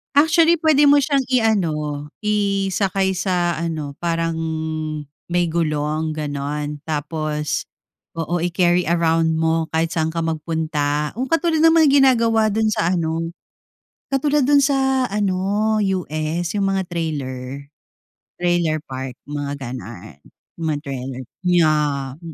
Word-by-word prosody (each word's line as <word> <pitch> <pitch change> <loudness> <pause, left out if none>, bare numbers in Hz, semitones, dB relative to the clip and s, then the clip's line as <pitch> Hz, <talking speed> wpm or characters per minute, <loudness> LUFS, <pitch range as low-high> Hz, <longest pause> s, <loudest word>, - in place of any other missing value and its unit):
Actually, 320 +2 +5
pwede 300 -2 +5
mo 285 0 +6
siyang 275 -1 +1
i-ano, 165 - 0 0.2
isakay 195 -2 0
sa 175 -3 0
ano 155 -4 -4
parang 165 -1 -1 0.9
may 175 -1 0
gulong 155 -1 -1
ganon 150 0 -3
tapos 150 0 -2 0.5
oo 165 +1 -2
i-carry 175 +1 +2
around 165 -1 +2
mo 160 0 +1
kahit 165 +1 +1
saan 160 0 -1
ka 165 - -1
magpunta. 155 -2 -1
Ang 260 - -1
katulad 330 +2 +1
ng 325 -2 +6
ginagawa 230 -5 +4
do'n 220 0 +2
sa 175 -3 +1
ano, 165 -1 -1 0.9
katulad 285 +1 +2
dun 285 +2 +5
sa 265 -2 +2
ano 205 +2 0
sa 200 - +1 0.2
US 155 +3 -2
yung 195 - +1
mga 195 -1 0
trailer, 140 -4 -4 0.7
trailer 170 -3 +1
park, 130 -1 -6 0.2
mga 145 -1 -3
ganun, 110 - -8 0.4
mga 160 -3 -1
trailer. 130 -1 -5 0.2
Yah! 150 -5 +2
165 Hz, 120 wpm, -21 LUFS, 150-210 Hz, 0.9 s, mo